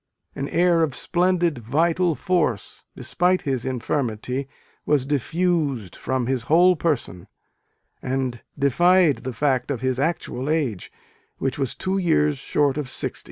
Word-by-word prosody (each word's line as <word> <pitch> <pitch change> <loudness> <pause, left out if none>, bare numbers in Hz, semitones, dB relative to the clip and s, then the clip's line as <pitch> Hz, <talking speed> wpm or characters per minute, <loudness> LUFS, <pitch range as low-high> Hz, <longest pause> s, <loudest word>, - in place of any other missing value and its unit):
An 140 - -4
air 170 -1 +3
of 150 -5 0
splendid 175 -4 +1
vital 165 +8 +1
force, 165 - -1
despite 180 +1 0
his 130 -4 -2
infirmity, 125 0 -2 0.4
was 145 -3 +1
diffused 145 - -1
from 130 -2 -2
his 130 0 -1
whole 180 +3 +6
person, 130 - -2 0.7
and 130 -2 -2 0.2
defied 170 +3 +4
the 130 - -5
fact 130 0 0
of 130 -5 -2
his 130 -1 -1
actual 145 -3 -2
age, 140 - -1 0.5
which 135 +1 -2
was 135 -3 -1
two 190 +1 -1
years 150 -5 +2
short 140 0 +1
of 140 -4 -4
sixty. - - -3
145 Hz, 135 wpm, -23 LUFS, 130-170 Hz, 0.7 s, whole